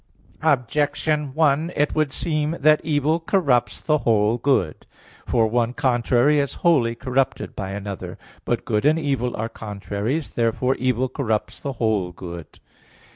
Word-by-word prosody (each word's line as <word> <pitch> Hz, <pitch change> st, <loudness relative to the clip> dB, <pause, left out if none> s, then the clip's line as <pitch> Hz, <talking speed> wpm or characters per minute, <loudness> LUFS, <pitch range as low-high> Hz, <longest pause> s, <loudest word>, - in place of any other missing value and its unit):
Objection 145 Hz, +1 st, 0 dB
1: 155 Hz, +2 st, +2 dB
It 150 Hz, +1 st, +1 dB
would 155 Hz, -3 st, +1 dB
seem 155 Hz, +1 st, -1 dB
that 150 Hz, +2 st, +4 dB
evil 155 Hz, +1 st, +1 dB
corrupts 145 Hz, -, +1 dB
the 155 Hz, -1 st, +1 dB
whole 110 Hz, 0 st, +2 dB
good. 120 Hz, -, 0 dB, 0.4 s
For 115 Hz, -2 st, +3 dB
one 120 Hz, +1 st, 0 dB
contrary 125 Hz, +3 st, +2 dB
is 140 Hz, -1 st, -1 dB
wholly 125 Hz, -9 st, +3 dB
corrupted 130 Hz, +1 st, -1 dB
by 95 Hz, -2 st, -4 dB
another. 100 Hz, -1 st, -6 dB, 0.3 s
But -, -, -2 dB
good 105 Hz, 0 st, 0 dB
and 155 Hz, +2 st, +4 dB
evil 135 Hz, -6 st, -1 dB
are 110 Hz, -, -2 dB
contraries. 105 Hz, +7 st, -4 dB
Therefore 120 Hz, +2 st, +1 dB
evil 130 Hz, 0 st, 0 dB
corrupts 115 Hz, -5 st, -2 dB
the 140 Hz, -, -4 dB
whole 110 Hz, -7 st, 0 dB
good. 85 Hz, -2 st, -9 dB
130 Hz, 140 wpm, -22 LUFS, 115-150 Hz, 0.4 s, that